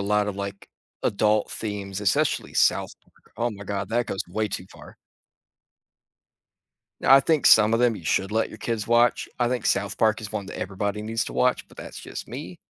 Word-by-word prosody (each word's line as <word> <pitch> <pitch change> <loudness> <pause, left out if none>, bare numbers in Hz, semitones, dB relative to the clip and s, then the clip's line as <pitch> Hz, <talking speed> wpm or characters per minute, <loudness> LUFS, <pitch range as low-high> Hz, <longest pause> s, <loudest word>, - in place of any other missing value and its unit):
lot 105 +1 +1
of, 105 - -3
like, 100 0 -6 0.4
adult 105 +1 +2
themes, 100 -2 -4
especially 100 -3 +1
South - - +2
Park. - - -29
Oh, 120 +1 0
my 100 - -9
God, 100 -1 -3
that 120 -1 +1
goes 95 - -3
way 110 +3 -1
too 95 -1 -5
far. - - -14 2.1
I 135 +1 +7
think 155 +1 +1
some 110 +1 +7
of 115 - +1
them 120 -3 +3
you 85 - -11
should 95 +4 0
let 110 - +1
your - - -11
kids 115 -3 -3
watch. 120 +1 +3
I 120 -1 +2
think 125 -2 -2
South 100 -1 0
Park 110 0 +2
is 105 - -7
one 100 -2 -4
that - - -8
everybody 100 +2 -3
needs 110 0 -1
to - - -6
watch, 125 0 +1
but - - -19
that's - - -9
just - - -8
me. 145 +7 -7
105 Hz, 200 wpm, -25 LUFS, 100-115 Hz, 2.1 s, I